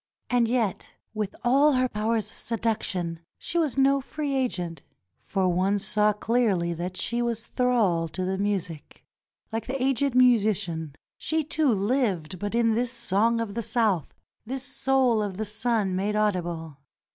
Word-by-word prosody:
And 245 -2 +3
yet 230 -5 -1 0.2
with 210 -3 -3
all 280 +5 +4
her 255 0 +2
powers 220 -1 -1
of - - -12
seduction 205 -7 -2 0.2
she 340 - -2
was 300 -6 0
no 275 +1 +4
free 290 +1 -4
agent, 180 - -2 0.4
for 190 -2 0
one 185 +3 +2
saw 210 +1 +2
clearly 210 -5 +1
that 180 +2 -5
she 235 0 -1
was 230 -1 -2
thrall 225 -12 +1
to 185 +3 -4
the 190 +1 -2
music. 190 -6 -3 0.5
Like 225 0 -3
the 270 +1 -2
aged 270 0 +1
musician, 200 - +2 0.2
she 320 0 0
too 300 -2 +2
lived 195 - 0
but 205 +3 -3
in 230 -1 +3
this 240 +2 0
song 230 0 +1
of 225 -3 -3
the 235 - -2
South 220 - 0 0.2
— - - -58
this 260 +1 -3
soul 265 -4 +2
of 200 -3 -3
the 215 - -2
sun 215 -2 0
made 200 +3 -1
audible. 175 -7 -1
220 Hz, 160 wpm, -26 LUFS, 190-250 Hz, 0.5 s, all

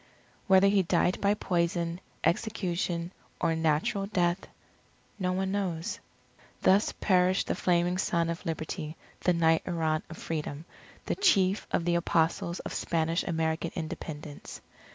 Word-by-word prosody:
Whether 190 0 +6
he 200 0 +4
died 180 +1 +1
by 200 +1 +3
poison, 170 -2 -1 0.2
execution, 175 -4 -1 0.3
or 165 - +1
natural 160 +5 +1
death, 180 -2 0 0.7
no 185 -1 0
one 190 +1 -1
knows. 185 -4 -2 0.6
Thus 195 +3 +4
perished 185 -1 +2
the - - 0
Flaming 180 0 +1
Son 170 -3 +1
of 170 0 -4
Liberty, 160 -1 -4 0.2
the 180 - +2
Knight 165 -1 +3
Errant 160 -3 0
of 165 - -9
Freedom, 155 -1 -4 0.4
the - - 0
Chief 200 - +3
of 170 - 0
the 175 - +2
Apostles 170 0 +1
of - - -6
Spanish 165 0 0
American 160 -1 -1
Independence. 155 -2 -6
170 Hz, 135 wpm, -29 LUFS, 165-185 Hz, 0.7 s, Whether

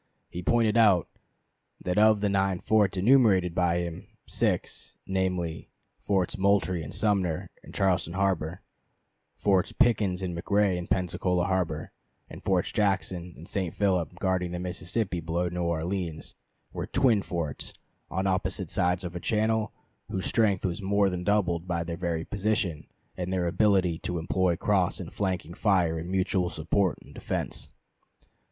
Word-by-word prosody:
He 90 - -5
pointed 115 +3 +2
out 100 -7 +5 0.7
that 90 +2 0
of 110 -1 +5
the 105 - +2
nine 95 -2 +1
forts 100 0 +2
enumerated 100 -5 +4
by 90 -1 +2
him, 85 0 -6 0.2
six, - - -1
namely, 90 -3 -2 0.3
Forts 95 -2 0
Moultrie 95 -3 +2
and 75 - -7
Sumter 95 -7 0
in - - -12
Charleston 90 -4 +1
harbor, 90 -3 -1 0.7
Forts 95 -3 +1
Pickens 100 -5 +2
and 90 -2 -3
McRae 100 +2 +2
in 90 0 -4
Pensacola 90 0 0
harbor, 90 -5 -1 0.4
and - - -10
Forts 95 -2 +1
Jackson 95 -4 0
and 80 - -11
St. 95 -2 -2
Philip 90 -5 +1
guarding 90 -2 0
the - - -2
Mississippi 90 +2 -2
below 85 +2 -1
New 90 +1 -3
Orleans, 85 0 -2 0.4
were - - -4
"twin 125 -6 +3
forts" 85 -6 -4 0.4
on 95 +2 -2
opposite 95 -1 -1
sides 90 +1 +1
of 90 0 -6
a - - -3
channel, 110 +2 +1 0.4
whose 95 - -3
strength 105 -5 +2
was 90 +2 -2
more 100 0 +2
than 90 0 -3
doubled 90 -4 +1
by 85 -1 -1
their 85 0 -4
very 85 -2 -2
position 100 -6 -1 0.3
and 90 0 -4
their 90 -2 0
ability 90 -2 +2
to 90 - -3
employ 90 +2 +1
cross - - +1
and - - -7
flanking 90 -4 -2
fire 90 -5 +2
in 85 +2 -6
mutual 95 -1 +1
support 85 +4 0
and - - -15
defense. - - -3
90 Hz, 150 wpm, -28 LUFS, 85-100 Hz, 0.7 s, out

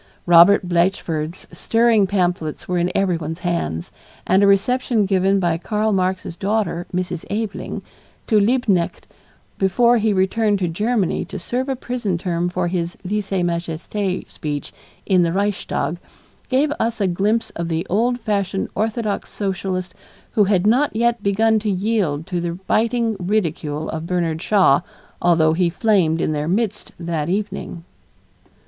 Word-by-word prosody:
Robert 175 +2 +6
Blatchford's 170 -2 -1
stirring 225 -3 +2
pamphlets 175 -5 -1
were 180 -1 0
in 175 +1 0
everyone's 170 -3 -1
hands, 85 - -2 0.3
and 190 +1 +3
a 200 - +5
reception 220 +2 +2
given 195 0 +2
by 170 -3 0
Karl 215 +3 0
Marx's 185 -2 -1
daughter, 195 -3 -1
Mrs. 180 -2 -3
Aveling, 210 0 -4 0.4
to 215 -3 +3
Liebknecht 205 -5 +1 0.5
before 235 +5 +3
he 220 0 +2
returned 205 +2 +2
to 185 -2 -1
Germany 205 +2 0
to 195 - -7
serve 250 +9 -2
a 265 - 0
prison 240 -7 -2
term 175 0 -1
for 180 0 -1
his 175 -1 -2
lese 205 +1 -2
majeste 170 -1 -3 0.3
speech 145 -2 -5 0.3
in 185 -2 +3
the 170 -1 +2
Reichstag, 195 -3 -1 0.5
gave 275 +3 +2
us 230 0 -1
a 200 - +2
glimpse 205 +6 0
of 170 0 -4
the 165 +1 -2
old 240 +6 +1
fashioned 200 -3 -1
orthodox 215 -1 -2
Socialist 190 -2 -3 0.4
who 210 - +3
had 190 -1 +2
not 250 +4 +3
yet 235 0 +1
begun 220 +2 +2
to 215 0 -2
yield 190 -6 0
to 175 -1 -3
the 170 -1 -2
biting 230 0 +1
ridicule 165 -6 -1
of 160 +1 -5
Bernard 170 -3 -1
Shaw 190 -9 +4 0.4
although 165 -2 +4
he 175 +1 +2
flamed 175 -4 +2
in - - 0
their 150 0 -2
midst 210 +3 -1
that 165 -2 -2
evening. 195 -3 -3
190 Hz, 145 wpm, -20 LUFS, 170-215 Hz, 0.5 s, Robert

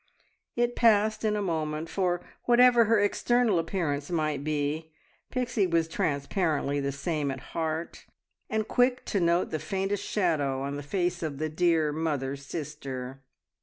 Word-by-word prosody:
It 240 0 +1
passed 215 -1 +3
in 215 -1 +1
a 205 - -1
moment, 160 -3 -2
for 180 -1 0 0.2
whatever 240 -1 +6
her 225 0 +3
external 220 0 +2
appearance 160 -5 -2
might 155 -4 -1
be, 155 +1 -2 0.4
Pixie 245 -6 0
was 165 -2 +1
transparently 145 -1 0
the 140 0 -1
same 150 +1 -2
at 135 0 -7
heart, 160 0 -3 0.4
and 220 0 -1
quick 250 0 +2
to 200 - 0
note 170 0 +2
the 155 - -1
faintest 195 +5 -2
shadow 145 -9 0
on 140 +1 -3
the 145 - -4
face 175 +3 -1
of 155 -4 -3
the 155 +2 -2
dear 160 -2 +2
mother 145 -4 -1
sister. 135 -3 -6
165 Hz, 150 wpm, -28 LUFS, 145-200 Hz, 0.4 s, whatever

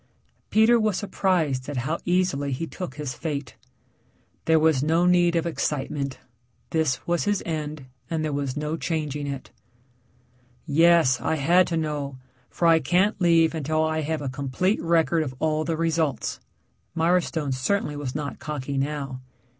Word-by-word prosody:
Peter 225 +2 +5
was 215 -4 +1
surprised 160 -10 0
at 145 - -4
how 150 +7 -1
easily 175 -6 +1
he 135 +6 -2
took 175 -4 -7
his 145 -3 -4
fate. 145 -7 -5 0.9
There 160 0 +4
was 155 -4 +3
no 165 +4 +2
need 175 -1 +4
of 165 - +1
excitement 140 -4 -2 0.5
this 160 -5 0
was 175 +2 0
his 205 -1 0
end 155 -3 -4 0.2
and 160 -1 -1
there 150 - -2
was 140 -1 -2
no 150 +2 -2
changing 150 -4 -3
it. 140 -2 -6 1.1
"Yes, 165 -4 +4
I - - 0
had 170 +5 +4
to 165 - -1
know, 145 -4 -3 0.3
for 170 - 0
I 165 -1 +6
can't 185 - +1
leave 165 -2 +4
until 155 0 0
I 160 0 0
have 155 0 -2
a - - -3
complete 140 - -1
record 165 0 +2
of 130 -4 -4
all 155 +1 0
the 165 -1 -1
results." 160 -3 -1 0.6
Mirestone 165 -4 +1
certainly 145 +4 -1
was 145 -3 -5
not 150 -2 -4
cocky 140 -2 -3
now. 135 -2 -3
155 Hz, 155 wpm, -25 LUFS, 140-170 Hz, 1.1 s, I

